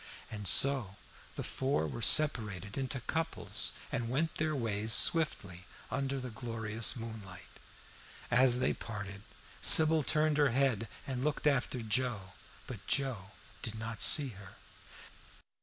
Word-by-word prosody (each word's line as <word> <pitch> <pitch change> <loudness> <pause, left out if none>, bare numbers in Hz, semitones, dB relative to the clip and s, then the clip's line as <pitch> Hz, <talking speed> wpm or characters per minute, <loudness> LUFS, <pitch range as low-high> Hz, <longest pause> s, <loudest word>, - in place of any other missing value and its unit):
And 105 -2 -4
so 130 -2 +5 0.4
the - - -5
four 130 - -2
were 65 -5 -7
separated 105 - +2
into 135 -1 -3
couples, 135 -9 -1 0.2
and 120 -5 -3
went 155 +6 -1
their 155 0 -1
ways 110 -3 -2
swiftly 100 - +1 0.2
under 135 +1 -2
the 125 -1 -7
glorious 115 0 -3
moonlight. 110 -6 -10 0.7
As 125 0 +5
they 125 - 0
parted 100 -2 -8 0.4
Sybil 160 0 +5
turned 150 +2 0
her 145 -2 +3
head 125 -3 0 0.2
and 130 -2 -4
looked 150 0 -2
after 130 -4 0
Joe, 110 -4 -2 0.3
but 105 -7 -10
Joe 125 -9 -1 0.3
did 110 - -3
not 110 0 -6
see 145 -3 +6
her. 100 -3 -13
120 Hz, 130 wpm, -32 LUFS, 105-140 Hz, 0.7 s, see